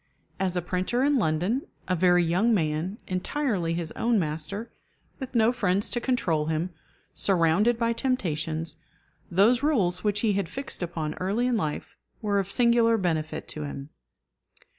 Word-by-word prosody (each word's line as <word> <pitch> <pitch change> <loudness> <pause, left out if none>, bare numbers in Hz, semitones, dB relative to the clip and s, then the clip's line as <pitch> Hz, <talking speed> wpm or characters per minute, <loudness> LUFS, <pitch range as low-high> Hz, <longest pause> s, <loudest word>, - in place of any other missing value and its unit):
As 185 -2 +1
a 175 - -1
printer 185 +8 0
in 285 -1 +3
London, 180 - 0 0.2
a 185 - +1
very 180 0 +4
young 185 +8 +2
man, 160 +3 -1
entirely 185 - -1
his 165 -2 -3
own 235 0 +1
master, 170 +6 -3 0.5
with 265 -2 -7
no 225 0 +5
friends 200 -5 0
to 240 - 0
control 175 - 0
him, 160 +3 -1 0.4
surrounded 195 +5 +2
by 230 0 +1
temptations, 165 - -2 0.5
those 210 +8 +4
rules 215 - +1
which 205 -1 +1
he 220 -3 +2
had 195 -4 -1
fixed 275 +1 -5
upon 165 -3 -3
early 200 +7 0
in 250 -1 +2
life 155 -9 -3 0.2
were 205 -2 +1
of 195 -1 -2
singular 235 0 +4
benefit 160 -5 -2
to 155 - -6
him. 140 0 -6
190 Hz, 155 wpm, -27 LUFS, 165-235 Hz, 0.5 s, no